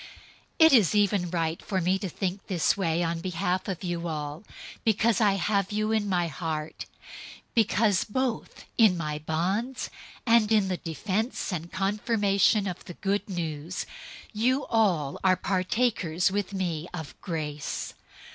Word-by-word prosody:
001:007 320 - +9
It 320 - +6
is 215 -6 +5
even 200 -3 +2
right 165 -1 -1
for 190 - -1
me 185 +2 +1
to 190 - -3
think 190 +3 -4
this 175 -5 +2
way 175 -3 0
on 165 0 -1
behalf 180 +1 -1
of 190 -3 -2 0.3
all 150 -2 -4
of - - -16
you, - - -21 0.3
because 225 0 +2
I 205 -2 +5
have 200 +1 0
you 215 +1 0
in 215 -2 +1
my 175 -2 +1
heart, 155 0 -4 0.7
because, 215 -3 +3
both 250 +1 -3
in 210 -6 +6
my 150 -2 -3
bonds 190 - -2 0.3
and 230 -2 +4
in 210 -3 +4
the 185 - -1
defense 200 - -2
and 170 0 -4
confirmation 200 +1 +2
of 180 -2 -4
the 175 - -9
Good 200 +2 -1
News, 165 -2 -3 0.5
you 250 +6 +1
all 180 -11 +2
are 185 -1 +5
partakers 185 -3 +1
with 205 0 -1
me 175 -4 -2
of 160 -5 -6
grace. 150 -5 -4
190 Hz, 155 wpm, -27 LUFS, 170-210 Hz, 0.7 s, 001:007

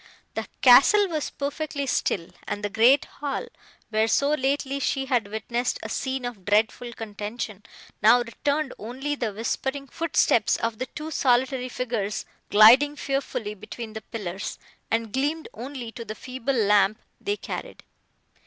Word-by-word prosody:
The - - -4 0.2
castle 335 +11 +7
was 310 -3 -2
perfectly 285 0 -3
still, 180 -9 0 0.2
and 205 - -4
the 205 - -2
great 240 +6 +5
hall, 285 - -4 0.5
where 220 0 +2
so 280 +5 +2
lately 275 0 0
she 270 0 0
had 245 -6 +1
witnessed 235 +4 -2
a - - -5
scene 265 -1 -2
of 235 -6 -6
dreadful 220 +4 +1
contention, 215 -1 -6 0.4
now 220 +3 +7
returned 285 +4 -1
only 260 +7 -4
the 240 -6 -2
whispering 265 +6 -3
footsteps 330 +4 +2
of 230 -1 -2
the 255 - -2
two 305 +5 -7
solitary 255 -1 +2
figures 230 -5 -2 0.2
gliding 250 +8 +7
fearfully 270 -7 -2
between 215 +2 -8
the 220 - -6
pillars, 200 -5 -5 0.3
and 225 -1 -1
gleamed 295 +5 -1
only 245 0 -6
to 230 - -7
the 215 -1 -7
feeble 255 +3 -4
lamp 210 -1 +3 0.2
they 410 +1 -2
carried. - - -7
245 Hz, 145 wpm, -25 LUFS, 220-275 Hz, 0.5 s, castle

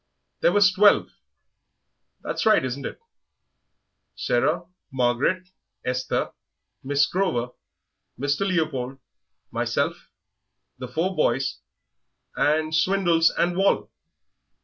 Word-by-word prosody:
"There - - +3
was 200 -1 +5
twelve. 205 +2 +4 1.1
That's - - -2
right, 215 -11 +5
isn't 130 +2 -4
it? - - -9 1.2
Sarah, 155 +8 0 0.3
Margaret, 135 +9 0 0.4
Esther, 125 0 -1 0.5
Miss 140 +1 +2
Grover, 125 -11 -1 0.7
Mr. 145 +8 0
Leopold, 145 -8 -1 0.5
myself, - - -2 0.7
the - - -5
four 185 +4 -1
boys, 135 -4 0 0.8
and 155 +1 +1
Swindles 170 -1 +3
and 175 0 0
Wall.... 195 +2 +1
155 Hz, 90 wpm, -24 LUFS, 135-185 Hz, 1.2 s, was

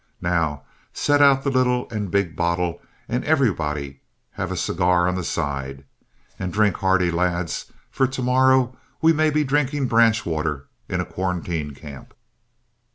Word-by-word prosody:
Now, 80 -4 0 0.3
set 145 0 +2
out 135 -1 +5
the 140 - 0
little 125 -1 +1
and 105 -3 -3
big 95 -4 0
bottle 85 +1 -1 0.3
and 125 +2 -2
everybody 75 - 0 0.3
have - - -4
a - - -3
cigar 90 0 +2
on 90 - +1
the 90 0 -3
side. 70 -4 -3 0.5
And 90 -1 -3
drink 105 -2 +2
hearty, 95 -3 +2
lads, 85 -1 -2 0.2
for 130 - +2
to 130 0 -4
morrow 130 0 +3 0.2
we 165 +1 +4
may 155 0 +2
be 150 0 +1
drinking 145 0 0
branch 115 -1 +3
water 75 -4 -2 0.2
in - - -1
a - - -4
quarantine 85 -5 -3
camp." 70 -1 -12
90 Hz, 155 wpm, -22 LUFS, 80-130 Hz, 0.5 s, out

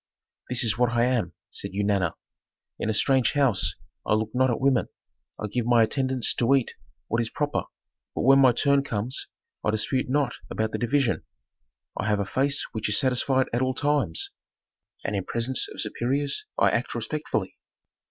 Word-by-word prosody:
"This 125 0 +2
is 110 -1 +1
what 125 -1 +4
I 120 0 +1
am," 120 -9 0 0.2
said - - -4
Eunana. 100 -3 0 0.6
"In - - -1
a - - +3
strange 130 +1 +3
house 135 -9 +2 0.3
I 105 - +2
look 110 0 -1
not 130 +1 +3
at 120 - 0
women. 135 -2 +2 0.5
I - - -3
give 115 +3 -2
my 120 -2 +5
attendants 130 +1 0
to 125 +3 +3
eat 130 -4 0 0.3
what 115 +2 0
is 115 - -2
proper, 145 +3 -2 0.5
but - - -1
when 135 +2 +6
my 130 -2 +7
turn 140 +3 +3
comes 120 -1 -2 0.4
I - - +1
dispute 115 +5 0
not 140 -2 +1 0.2
about 110 0 -2
the - - -3
division. 125 0 +1 0.7
I - - -2
have 105 -1 +1
a 100 - 0
face 140 +7 0
which 110 -1 -2
is 105 - +2
satisfied 130 0 +2
at 120 - +1
all 130 0 0
times, 145 - 0 0.7
and 105 - -1
in 95 - -1
presence 120 +5 +1
of - - -10
superiors 140 +4 -1
I 100 0 +4
act 120 +1 -1
respectfully. 150 +7 -3
120 Hz, 180 wpm, -26 LUFS, 110-135 Hz, 0.7 s, my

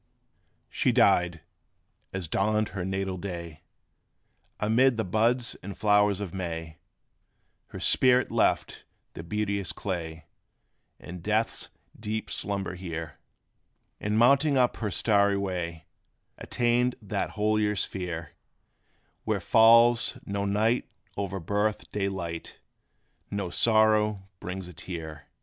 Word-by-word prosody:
She - - +2
died, 90 -2 +3 0.7
as 95 -3 -4
dawned 105 +5 +1
her 95 -1 -5
natal 95 0 -2
day! 85 -4 -7 1.0
Amid 120 +4 +3
the 110 - 0
buds 115 +5 +1
and 100 0 -8
flowers 105 -1 +3
of 100 -5 -5
May 80 -4 -5 0.9
Her - - -9
spirit 125 0 +3
left - - +1 0.3
the - - -7
beauteous 100 +1 -2
clay, 80 -5 -5 0.7
In 90 0 -9
death's 110 +5 0 0.3
deep 110 0 -4
slumber 100 -2 -2
here; 85 -5 -6 0.8
And 105 +1 -1
mounting 140 +4 +4
up 125 -1 +2
her 110 - -2
starry 100 0 +2
way, 90 -4 -4 0.5
Attained 120 +1 +1
that 105 -4 -3
holier 105 0 +1
sphere, 90 -4 -4 0.9
Where - - 0
falls 115 +1 +5
no 100 0 -2
night 110 +4 +1 0.3
o'er 100 -1 -3
birth 105 +5 -1
day 100 -1 -1
light 85 -4 -6 0.7
No 100 -3 -3
sorrow 110 -3 +3
brings 90 0 -6
a 90 - -11
tear. 80 -2 -7
100 Hz, 115 wpm, -27 LUFS, 90-110 Hz, 1.0 s, falls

